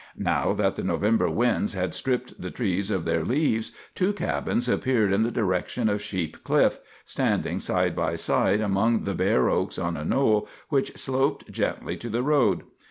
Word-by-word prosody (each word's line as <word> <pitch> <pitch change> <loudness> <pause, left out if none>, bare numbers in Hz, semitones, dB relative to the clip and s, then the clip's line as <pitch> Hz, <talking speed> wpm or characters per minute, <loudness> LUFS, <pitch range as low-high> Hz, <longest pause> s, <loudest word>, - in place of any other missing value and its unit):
Now - - +1
that - - 0
the - - -3
November 95 +2 +2
winds 110 +3 +1
had 95 -1 -2
stripped 125 -1 -2
the 90 - -4
trees 100 -3 -1
of 95 -5 -1
their 80 - +1
leaves, 115 - 0 0.2
two 190 +2 +1
cabins 125 -10 -1
appeared 120 -5 +2
in 100 - +2
the 115 - +2
direction 110 +1 0
of 105 0 -1
Sheep 95 -6 -4
Cliff, - - +2 0.3
standing - - 0
side - - 0
by 85 0 0
side 95 +5 +2
among 110 +3 +2
the - - -2
bare 65 - +2
oaks - - 0
on 85 0 -2
a 75 - -5
knoll 110 - +2 0.2
which 140 -3 0
sloped 135 +1 -1
gently - - -2
to 120 - -7
the 120 +3 -1
road. 130 - +2
105 Hz, 175 wpm, -26 LUFS, 90-125 Hz, 0.3 s, November